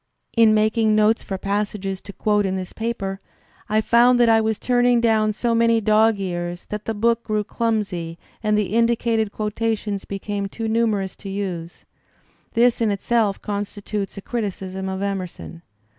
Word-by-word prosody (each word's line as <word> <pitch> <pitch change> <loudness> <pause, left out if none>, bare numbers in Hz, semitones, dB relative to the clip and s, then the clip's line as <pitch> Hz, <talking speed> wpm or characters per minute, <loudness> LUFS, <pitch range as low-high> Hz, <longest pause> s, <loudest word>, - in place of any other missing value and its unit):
In 225 -2 +6
making 215 0 +2
notes 215 +1 +3
for 195 - -4
passages 200 -1 -2
to - - -10
quote 210 +1 +1
in 190 -1 -1
this 185 -1 -5
paper, 200 -4 -3 0.5
I 215 +1 +3
found 240 +2 +4
that 240 -1 +5
I 225 0 +5
was 220 -1 0
turning 245 -1 +3
down 220 -2 +3
so 230 +3 -1
many 230 0 +3
dog 215 0 +3
ears 175 -2 -4
that 210 0 -4
the 225 - -2
book 230 +2 +1
grew 215 -1 -1
clumsy 200 -8 -2 0.2
and 215 -1 +1
the 205 -1 -1
indicated 230 -2 +2
quotations 210 -1 -2
became 200 0 -4
too 225 +3 -5
numerous 220 -4 0
to 200 - -8
use. 180 -4 -5 0.7
This 240 0 +3
in 225 - +3
itself 205 0 0
constitutes 205 0 -4
a 200 - -7
criticism 190 -4 -4
of 190 +1 -3
Emerson. 185 -4 -5
210 Hz, 160 wpm, -22 LUFS, 195-225 Hz, 0.7 s, In